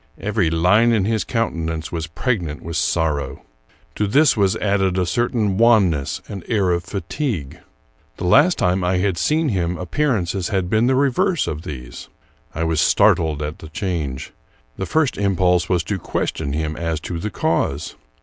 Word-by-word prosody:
Every 100 -4 0
line 90 +9 +3
in 105 -4 +2
his 110 +1 0
countenance 80 -9 -2
was 80 -2 -3
pregnant 85 - -2
with 85 0 -5
sorrow. 75 -5 -1 0.5
To 105 - -1
this 145 +9 +4
was 100 -3 +2
added 95 -2 0
a 90 - +1
certain 110 -1 0
wanness 100 - +3
and 100 -4 -7
air 100 -5 +1
of 85 0 0
fatigue. 100 - -4 0.6
The - - -6
last 145 - +5
time 90 +1 +1
I 90 +1 +1
had 95 0 +1
seen 155 0 +1
him 90 -4 -1
appearances 95 - -1
had 95 -3 -1
been 110 +2 +3
the 130 - +3
reverse 145 +6 +1
of 75 -1 -4
these. 65 -6 -8 0.5
I 80 - -1
was 80 -2 +1
startled 75 -2 +3
at 75 +1 -5
the 80 - -10
change. 80 -8 -4 0.4
The 95 - -4
first 150 - +1
impulse 90 -3 +2
was 90 -2 +1
to 100 +2 -3
ques - - -2
tion 70 - -4
him 80 0 -2
as 80 -1 -2
to 85 0 -5
the 105 - -3
cause. 75 -5 -1
90 Hz, 170 wpm, -20 LUFS, 80-110 Hz, 0.6 s, last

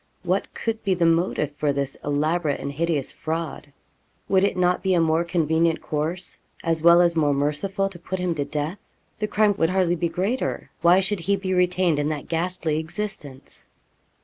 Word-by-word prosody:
What - - -1
could 225 -1 -3
be 195 -2 +1
the 175 -1 +1
motive 165 -3 +1
for 145 0 -1
this 140 -1 -2
elaborate 150 +1 0
and 140 - -4
hideous 155 -2 -1
fraud? 160 -2 -5 0.6
Would 190 0 +4
it 200 - +1
not 180 0 +2
be 190 -1 +2
a - - +3
more 165 0 +2
convenient 165 -1 +1
course, 160 +4 -4 0.2
as 165 -1 0
well 170 +1 +7
as 170 -1 +3
more 145 -3 +2
merciful 185 +8 0
to 180 -3 -12
put 190 +2 -4
him 180 -1 -1
to 145 -3 -2
death? 150 +6 -5 0.2
The 215 - -1
crime 210 -1 +3
would 165 - +3
hardly 185 -2 +2
be 170 0 -1
greater. 200 +10 -2
Why 175 +3 +5
should 195 +1 -1
he 200 +4 +1
be 190 -1 -3
retained 180 -3 +2
in 145 +1 0
that 150 -2 -4
ghastly 165 -2 -1
existence? 160 -6 -7
170 Hz, 185 wpm, -24 LUFS, 155-185 Hz, 0.6 s, well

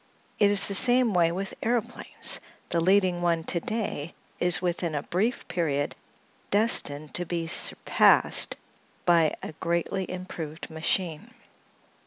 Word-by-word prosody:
It 205 - +5
is 200 -1 +3
the 200 - -4
same 245 +2 +4
way 170 -2 +3
with 190 +2 -4
aëroplanes; 235 -1 0 0.3
the 170 - 0
leading 185 0 +2
one 170 -2 +1
to 170 - -2
day 195 -6 -4 0.2
is 175 0 +4
within 175 -3 -2
a 145 - -2
brief 220 +7 -2
period 145 -5 -1 0.6
destined 155 -9 +2
to 175 - -2
be 170 -1 -3
surpassed 165 - +2 0.5
by 165 -3 +3
a - - -5
greatly 170 +3 -2
improved 165 -4 -7
machine. 160 0 -2
175 Hz, 130 wpm, -26 LUFS, 165-195 Hz, 0.6 s, It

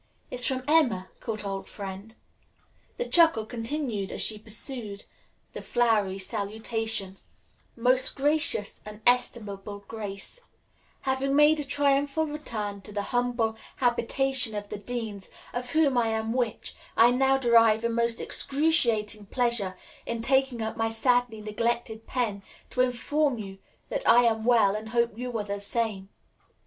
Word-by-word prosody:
"It's 250 0 -1
from 260 -1 -1
Emma, 250 - +3
good 215 -3 -5
old 195 -1 -4
friend." 200 +2 -8 0.8
The 485 - -2
chuckle 325 -11 +5
continued 230 -3 -3
as - - -5
she 215 -1 +2
perused 215 -1 -3 0.5
the - - -6
flowery 215 -5 +1
salutation: 215 0 -2 0.6
"MOST 255 +2 +2
GRACIOUS 290 -7 +1
AND 210 0 -10
ESTIMABLE 205 -5 0
GRACE: 205 - -6 0.6
"Having 270 +1 0
made 300 +1 +5
a - - -1
triumphal 285 +2 +1
return 220 -10 -5
to 200 - -11
the 205 0 -2
humble 240 -2 +1 0.2
habitation 250 0 +1
of 205 0 -5
the 205 - -5
Deans, 215 -3 -5 0.2
of 245 0 -4
whom 310 -4 +3
I 230 - +2
am 220 0 -1
which, 240 -3 -2 0.2
I 235 +2 +7
now 265 +2 +3
derive 230 -3 +4
a 235 - +1
most 235 0 0
excruciating 230 -9 +1
pleasure 235 -6 0 0.3
in 235 -1 -3
taking 265 -2 +1
up 220 - -3
my 225 0 0
sadly 245 -1 +1
neglected 225 +1 -2
pen 220 -6 -1 0.3
to 250 - +1
inform 255 +3 +1
you 195 -3 -8 0.3
that - - -2
I 240 +1 +7
am 225 -2 +1
well 225 -5 +4
and 215 +1 -5
hope 235 -1 +1
you 245 0 -4
are 210 - -2
the 200 0 -4
same. 200 -2 -3
230 Hz, 145 wpm, -27 LUFS, 210-255 Hz, 0.8 s, I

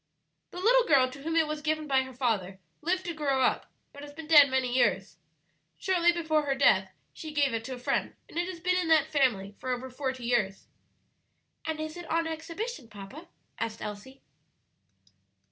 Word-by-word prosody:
"The - - -11
little 475 +6 +4
girl 260 -4 +4
to 275 +1 -11
whom 325 +3 -3
it 325 -1 +4
was 305 0 -4
given 310 0 -1
by 270 -2 +3
her 260 0 -8
father 200 -7 -1 0.2
lived 365 +3 -1
to 340 - -3
grow 280 -4 0
up, - - 0 0.2
but 285 - -11
has 290 0 -9
been 320 +1 -9
dead 300 -3 +8
many 260 -1 0
years. 260 - +1 0.6
Shortly 345 -2 +3
before 315 -3 0
her 275 - +1
death 190 -8 +3 0.2
she 315 - -8
gave 285 -4 +1
it 225 0 -2
to 260 - -5
a - - -10
friend, 245 - -1
and 335 - -5
it 350 - -1
has 360 -3 -7
been 360 +2 +1
in 360 -2 0
that 315 -1 +3
family 225 -9 +1
for 255 - -5
over 255 +1 -3
forty 260 -1 -4
years." 210 -5 0 1.0
"And 320 -1 -3
is 310 0 -5
it 350 - -9
on 330 +1 +1
exhibition, 325 - -5
papa?" 215 - -11 0.3
asked 225 -1 -3
Elsie. 210 +6 -8
290 Hz, 195 wpm, -29 LUFS, 255-325 Hz, 1.0 s, dead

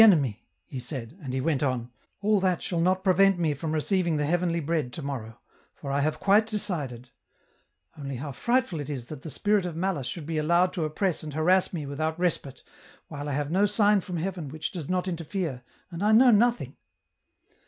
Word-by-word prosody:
enemy," 145 - +5 0.2
he 130 - -6
said, 125 0 -5
and 135 -4 -5
he 130 - -1
went 140 0 0
on: 125 -4 -1
" - - -47
All 210 0 +4
that 185 -2 +1
shall 170 -2 -1
not 185 +2 +2
prevent 195 0 +4
me 165 -4 +1
from 155 +3 -4
receiving 170 +1 +1
the 150 - +1
Heavenly 170 +1 +1
Bread 155 -4 -1
to 160 - -6
morrow, 120 -5 -5 0.4
for 140 - -6
I 140 +1 +1
have 155 +2 0
quite 205 +2 +4
decided; 150 - -3 0.8
only 140 -2 -5
how 140 +4 -5
frightful 235 - 0
it 145 0 -5
is 130 -5 -4
that 150 +1 -8
the 160 - -7
Spirit 205 +8 +1
of 170 - -6
Malice 170 -7 -1
should 155 +4 -5
be 160 0 -1
allowed 170 +4 +3
to 165 - -1
oppress 170 +3 -1
and 150 -2 -7
harass 180 +4 +3
me 160 -5 -4
without 155 +3 -2
respite 145 -7 -1 0.5
while 145 -1 -5
I - - -2
have 145 +2 -2
no 195 +4 +4
sign 205 0 +3
from 180 -1 -5
Heaven 170 -3 -3
which 155 +3 -4
does 165 -6 -6
not 180 0 0
interfere, 165 -5 -3 0.3
and 170 +1 -6
I 210 +1 +4
know 245 +3 +7
nothing. 235 +3 +2
165 Hz, 205 wpm, -27 LUFS, 140-185 Hz, 0.8 s, know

